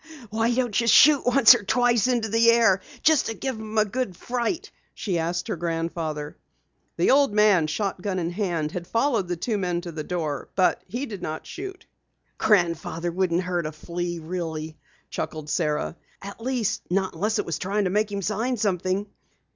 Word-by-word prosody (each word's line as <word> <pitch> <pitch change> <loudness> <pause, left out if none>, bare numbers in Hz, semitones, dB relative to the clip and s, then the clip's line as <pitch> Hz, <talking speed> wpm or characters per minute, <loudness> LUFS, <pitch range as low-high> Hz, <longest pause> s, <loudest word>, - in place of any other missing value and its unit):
"Why 225 +2 +1
don't 240 -2 +1
you 230 - -1
shoot 285 +2 +6
once 250 -2 +8
or - - -1
twice 240 +1 +2
into 240 -3 +1
the 230 +2 +4
air 225 -5 +4 0.2
just 315 -3 +4
to 225 - -3
give 265 +3 -3
'em 220 0 -6
a 215 - +5
good 205 -4 -3
fright?" 285 - -3 0.2
she 185 -5 -2
asked 175 +3 -2
her 215 - -2
grandfather. 165 -3 -3 0.6
The - - +3
old 275 -4 +4
man, 205 -7 +4
shotgun 190 +2 -2
in 170 -1 -2
hand, 175 -6 -2
had 175 0 -6
followed 230 -3 +1
the 175 - -2
two 210 +5 -2
men 180 -2 -1
to 175 -1 -7
the 155 -1 -5
door. 155 -4 -3
But 185 -2 +2
he 240 +9 -3
did 205 -8 -8
not 155 -2 -5
shoot. 380 +1 -8 0.5
"Grandfather 175 -4 +1
wouldn't 180 0 0
hurt 175 -3 -1
a - - -5
flea 175 +3 -4
really," 160 -2 -5 0.4
chuckled 155 -1 -4
Sara. 150 -1 -1 0.2
"At 200 +3 -9
least, 230 -3 -1
not 190 +1 0
unless 215 +3 -1
it - - -1
was 170 - -3
trying 200 +3 0
to 185 - 0
make 210 +1 +1
him 200 -1 -3
sign 225 +6 -1
something." 190 -1 0
195 Hz, 185 wpm, -25 LUFS, 170-230 Hz, 0.6 s, once